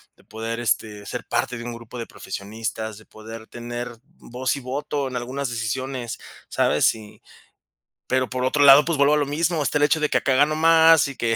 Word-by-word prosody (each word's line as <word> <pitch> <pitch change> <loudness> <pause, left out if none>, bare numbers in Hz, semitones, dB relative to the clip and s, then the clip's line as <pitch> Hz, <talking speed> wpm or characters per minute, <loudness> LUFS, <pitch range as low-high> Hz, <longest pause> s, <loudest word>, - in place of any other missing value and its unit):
de - - -24
poder, 115 +1 -5
este, 105 -3 -2
ser 125 - -6
parte 120 +1 -1
de 115 - -7
un 120 - -5
grupo 115 +1 -10
de 115 - -5
profesionistas, 110 +2 -6
de 110 - -16
poder 110 +1 -11
tener 120 0 -6 0.2
voz 130 +3 -3
y 140 - -7
voto 140 +2 -3
en 130 - -8
algunas 130 +2 -4
decisiones, 120 +2 -4 0.3
¿sabes? - - +2
Y 110 -2 -13 0.9
pero 130 -1 0
por 125 0 -3
otro 145 +3 +2
lado, 140 +1 +8
pues 170 -2 -1
vuelvo 145 +1 +5
a - - +2
lo 145 - +1
mismo, 155 +2 0
está 145 +2 0
el - - +2
hecho 155 +2 +2
de 150 - 0
que - - +2
acá 130 -2 +1
gano 150 +3 +3
más 165 0 +6
y 140 - -7
que 115 -1 0
125 Hz, 210 wpm, -23 LUFS, 115-145 Hz, 0.9 s, lado